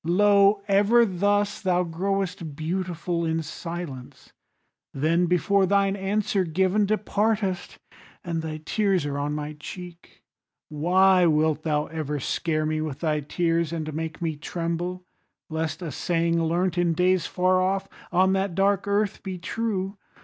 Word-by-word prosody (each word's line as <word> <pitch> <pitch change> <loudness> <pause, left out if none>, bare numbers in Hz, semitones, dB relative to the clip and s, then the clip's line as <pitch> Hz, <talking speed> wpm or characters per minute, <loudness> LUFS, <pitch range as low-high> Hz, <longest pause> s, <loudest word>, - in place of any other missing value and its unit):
Lo! 200 +3 +4
ever 205 +4 +5
thus 205 +2 0
thou 180 -2 +2
growest 180 -2 -2
beautiful 170 +1 -2
In 160 0 -1
silence, 165 -5 -8 0.6
then 165 +5 +2
before 190 +3 +2
thine 200 0 +2
answer 200 0 0
given 190 +5 +1
Departest, 210 -2 -1 0.5
and 165 -2 -2
thy 155 -1 -5
tears 195 -6 +1
are 145 -1 -2
on 145 +1 -2
my 150 0 -4
cheek. 175 +2 -10 0.5
Why 180 +4 +4
wilt 155 -1 +2
thou 150 -2 0
ever 150 -2 -4
scare 155 +3 -1
me 155 0 -1
with 150 -3 -5
thy 155 -2 +1
tears, 165 +2 0
And 155 -2 -4
make 160 +1 -4
me 160 -2 -1
tremble 175 +3 -3 0.5
lest 160 +3 -3
a 165 - -4
saying 170 0 0
learnt, 175 +2 0
In 170 -1 +2
days 180 +1 +2
far 185 0 +2
off, 190 +1 0 0.2
on 190 +2 +3
that 190 -2 -1
dark 195 +1 +2
earth, 205 0 0
be 190 -2 -5
true? 195 0 -3
175 Hz, 140 wpm, -25 LUFS, 160-195 Hz, 0.6 s, ever